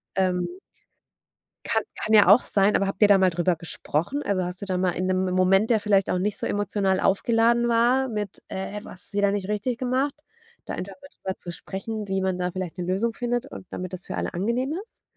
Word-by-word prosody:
ähm 185 - 0 1.1
kann - - +1
kann 220 - -2
ja 210 -3 +7
auch 205 +7 +7
sein, 200 +1 +2
aber 195 - +2
habt 195 +1 -5
ihr 210 - +8
da 200 -1 +6
mal 190 -1 +4
drüber 175 +1 +1
gesprochen? 170 - -2
Also, 190 -2 0
hast 180 +1 -4
du - - -4
da 185 -2 -1
mal 180 0 +1
in 180 +2 -2
'nem 185 0 +1
M - - -2
Moment, 195 +3 +4
der 225 -2 +4
vielleicht 200 -2 +2
auch 180 - +1
nicht 200 +2 -1
so - - -3
emotional 200 -2 0
aufgeladen 235 +4 +3
war, 245 +3 +3
mit: 210 -3 -4
„Äh, 195 +2 -5
was 185 - -8
wieder 200 0 +2
nicht 200 -2 -2
richtig 210 +4 -1
gemacht”, 260 +3 0 0.5
da - - -5
einfach 195 +1 -6
mal 280 - -12
drüber 190 0 -5
zu 175 - -7
sprechen, 205 +4 -5
wie 190 0 -1
man 190 -1 0
da 180 0 -1
vielleicht 185 -1 -5
'ne 180 - -3
Lösung 195 +6 0
findet 245 +2 -2
und 275 - -10
damit 185 0 -5
das 185 0 -5
für - - -4
alle - - -3
angenehm 235 - -1
ist? 455 - -25
195 Hz, 225 wpm, -25 LUFS, 185-225 Hz, 1.1 s, ihr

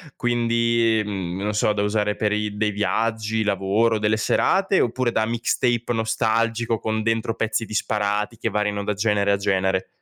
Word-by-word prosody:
quindi 115 -1 +1
mhmm, 95 -3 -4
non 105 +1 -1
so 105 0 +2
da 100 - -1
usare 105 0 0
per 105 -1 0
i 105 -1 -2
dei 105 0 0
viaggi, 110 +1 -1
lavoro, 105 +3 +1
delle 105 +1 +1
serate, 195 - +2
oppure 120 0 0
da 110 - +1
mixtape 120 +1 0
nostalgico, 115 0 0
con 110 0 -2
dentro 115 0 -1
pezzi 110 +1 -1
disparati 105 +1 -1
che - - -2
variano 105 -1 -1
da 105 - -1
genere 100 -1 +1
a 100 - +2
genere? 95 -1 0
110 Hz, 160 wpm, -23 LUFS, 105-115 Hz, -, so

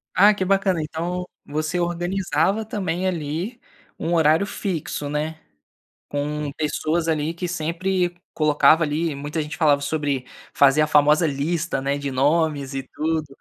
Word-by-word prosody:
Ah, 205 +3 +7
que 195 -2 -2
bacana. 195 -3 +2
Então, 175 +4 -3 0.2
você 155 +4 -2
organizava, 175 +2 0
também, 190 -5 -2
ali, 175 +7 -3 0.4
um 170 - -1
horário 160 +2 +4
fixo, 170 -7 -3
né. 155 +2 -3 0.7
Com 145 +1 -2
pessoas 155 +2 -1
ali 155 0 0
que 175 +2 -4
sempre 175 +1 -1 0.2
colocava 155 +1 +4
ali 155 +1 -1
muita 145 +3 -4
gente 150 - -6
falava 145 -3 +3
sobre 140 -3 -1 0.3
fazer 140 +1 +5
a 155 - +4
famosa 150 +3 +4
lista, 155 +1 -1
né, 140 +1 -1
de 140 -1 -3
nomes 145 0 +1
e 135 - -2
tudo. 160 0 -1
160 Hz, 145 wpm, -23 LUFS, 150-175 Hz, 0.7 s, Ah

